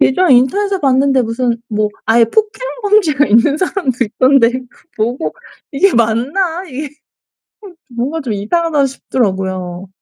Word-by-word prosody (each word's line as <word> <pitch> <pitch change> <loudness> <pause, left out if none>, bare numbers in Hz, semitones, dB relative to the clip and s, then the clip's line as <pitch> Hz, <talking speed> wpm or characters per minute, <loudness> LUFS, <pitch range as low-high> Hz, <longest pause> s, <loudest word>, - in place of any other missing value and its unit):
예전에 335 +1 +4
인터넷에서 390 +11 +1
봤는데 270 -1 +2
무슨 235 +1 -1
뭐 215 -1 0 0.2
아예 230 +1 +5
폭행 430 - -1 0.2
범죄가 345 -9 +3
있는 235 +7 +3
사람도 345 -8 -2
있던데 255 +2 +3 0.2
그 - - -25
보고 240 +7 -2 0.4
'이게 355 +5 +2
맞나?' 280 - 0
이게 285 +1 -6 1.1
뭔가 285 +7 -2
좀 250 -6 -4
이상하다 295 +8 0
싶더라고요. 190 -8 -3
260 Hz, 300 characters per minute, -15 LUFS, 230-325 Hz, 1.1 s, 아예